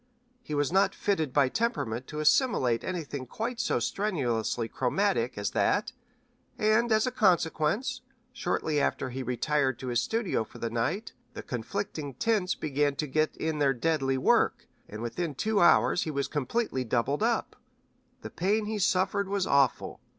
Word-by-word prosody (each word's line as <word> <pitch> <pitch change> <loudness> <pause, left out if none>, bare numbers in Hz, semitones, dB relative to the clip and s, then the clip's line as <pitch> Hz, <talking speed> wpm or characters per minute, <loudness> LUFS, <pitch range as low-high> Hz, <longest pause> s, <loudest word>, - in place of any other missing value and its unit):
He 155 -11 -5
was 145 +1 +1
not 190 +2 +3
fitted 160 -9 0
by 140 0 +3
temperament 130 - -2
to 150 - -6
assimilate 150 - +2
anything 145 -7 -4
quite 230 - -4
so - - +1
strenuously 125 - -1
chromatic 130 - 0
as 100 -2 -2
that, - - +1 0.7
and, 220 +2 +2
as 215 0 +4
a 255 - -1
consequence, 180 - +1 0.3
shortly 160 -7 -1
after 130 -2 -1
he 130 - -5
had 130 - -5
retired 130 +1 0
to 130 0 -6
his 120 -1 +1
studio 225 - -1
for - - -14
the 115 - -3
night, 125 - -2 0.2
the - - -6
conflicting 145 - -4
tints 200 - +1
began 145 -1 0
to 150 - -2
get 155 +2 0
in 160 -1 -2
their 135 -2 +3
deadly 135 -1 0
work, 130 - +2 0.2
and 110 +2 -7
within 150 +6 -3
two 215 +8 +1
hours 175 +1 +5
he - - -2
was 140 -2 -1
completely 145 - -1
doubled 125 +4 0
up. 230 +1 0 0.7
The - - -7
pain 210 +4 0
he 215 0 -3
suffered 190 +1 +1
was 200 -2 0
awful. 140 -3 +1
150 Hz, 165 wpm, -28 LUFS, 130-200 Hz, 0.7 s, hours